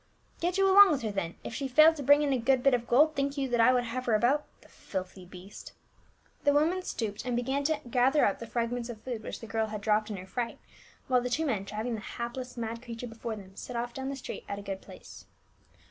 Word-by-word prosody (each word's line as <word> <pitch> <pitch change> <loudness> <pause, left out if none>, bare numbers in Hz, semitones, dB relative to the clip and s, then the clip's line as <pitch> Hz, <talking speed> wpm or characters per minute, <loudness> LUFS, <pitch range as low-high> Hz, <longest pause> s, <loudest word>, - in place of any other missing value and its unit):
" - - -32
Get 350 +2 0
you 390 0 +4
along 395 +1 +9
with 285 -5 0
her 215 - -1
then; 185 -4 -3
if - - -6
she 275 +3 -3
failed 310 +5 +6
to 285 - -4
brincT 285 +2 +6
in 280 -2 +1
a 260 - +1
good 255 +1 +2
bit 275 - +5
of 240 -1 0
gold, 300 +6 +5
think 280 0 -1
you 275 -1 0
that 240 -1 +2
I 240 +3 +6
would 250 -1 +2
havc^ 250 +2 -4
her 230 - +3
about 260 +7 +2
?— - - -35
the - - -18
filthy 185 -1 -7
beast." 185 +2 -11 0.7
The 285 - +4
woman 325 +6 +2
stooped 215 - -4
and 250 -1 -2
began 265 +4 -1
to 315 0 +1
gather 260 +5 +3
up 200 - 0
the 230 - -7
fragments 235 +1 -2
of 230 -3 -7
food 240 -4 -4
which - - -7
the - - -7
girl 220 0 -1
had 215 -1 -6
dropped 215 +1 +1
in 210 - -4
her 185 - -8
fright, 235 +4 -4 0.5
while 250 -1 +3
the 250 - -3
two 315 +6 0
men 210 -9 -1
driving 215 +4 -3
the 220 - -4
hapless 245 +3 -6
mad 230 0 -4
creature 235 -1 -7
before 230 -1 -5
them 195 -2 -12
set 250 - -7
off 240 0 -3
down 265 +1 -4
the 275 - -3
street 270 - -7
at 200 - -3
a 200 - -8
good 195 -1 -5
pace. - - -13
240 Hz, 265 wpm, -29 LUFS, 220-275 Hz, 0.7 s, along